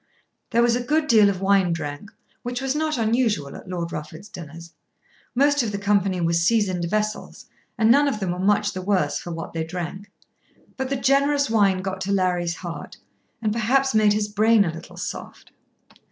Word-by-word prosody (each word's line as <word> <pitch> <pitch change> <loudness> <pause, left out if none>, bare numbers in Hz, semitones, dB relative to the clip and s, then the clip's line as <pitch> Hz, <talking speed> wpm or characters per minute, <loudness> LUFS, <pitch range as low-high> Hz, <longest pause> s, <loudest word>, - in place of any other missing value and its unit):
There 235 0 +3
was 235 0 +3
a 245 - -1
good 300 +5 +1
deal 215 -7 +5
of 190 -1 -3
wine 195 -3 +3
drank, 150 +5 -6 0.3
which 245 0 -4
was 270 +1 -1
not 310 -1 -1
unusual 220 - 0
at - - -11
Lord 170 -2 -4
Rufford's 155 +6 -8
dinners. 170 -1 -10 0.6
Most 285 +2 +3
of 225 -3 -2
the 200 - -3
company 200 -2 +1
were 170 0 +1
seasoned 180 0 +1
vessels, 215 +4 -3 0.3
and 220 0 +4
none 285 +3 +5
of 265 -7 -1
them 190 -3 -2
were 180 - -4
much 205 +2 +2
the 185 - -5
worse 190 0 0
for - - -8
what 165 -1 -6
they 165 -1 -2
drank. 180 +4 -6 0.7
But 265 -1 -3
the 275 - 0
generous 280 0 +2
wine 195 -4 +3
got 190 0 -4
to 200 - -2
Larry's 180 -3 0
heart, 175 -2 -8 0.5
and 215 -1 +1
perhaps 260 +4 +1
made 215 -1 +4
his 210 0 0
brain 215 0 +3
a 165 - -2
little 165 - -11
soft. - - -7
205 Hz, 190 wpm, -23 LUFS, 180-235 Hz, 0.7 s, deal